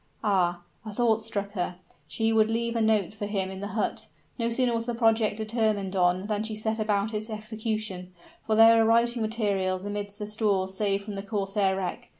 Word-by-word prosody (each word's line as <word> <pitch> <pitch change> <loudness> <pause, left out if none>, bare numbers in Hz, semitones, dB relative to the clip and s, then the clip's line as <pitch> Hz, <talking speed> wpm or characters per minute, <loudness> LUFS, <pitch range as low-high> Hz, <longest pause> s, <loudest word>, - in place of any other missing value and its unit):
Ah! 180 -4 +1 0.2
a 215 - -7
thought 225 0 +2
struck 205 -2 -3
her: 180 -3 -3 0.3
she 225 0 0
would 220 -1 +4
leave 235 +1 -1
a 230 - +1
note 215 -4 +2
for 205 -1 -5
him 195 -2 -2
in 190 - -7
the 200 - -4
hut! - - -2 0.3
No 230 0 +1
sooner 240 +1 +2
was 230 0 -2
the 240 - -1
project 225 -2 +2
determined 215 -3 0
on 180 +1 +2
than 210 -1 -1
she 220 0 -2
set 220 +1 -2
about 210 0 0
its 215 +1 -3
execution; 215 -4 -4 0.3
for 220 - 0
there 225 +1 +8
were 225 - +5
writing 235 +1 +3
materials 200 -4 -1
amidst 205 0 -5
the 210 - -4
stores 205 -3 0
saved 200 0 0
from 205 0 -6
the 195 - -4
corsair 195 -1 0
wreck. 190 -2 -4
215 Hz, 200 wpm, -27 LUFS, 195-225 Hz, 0.3 s, there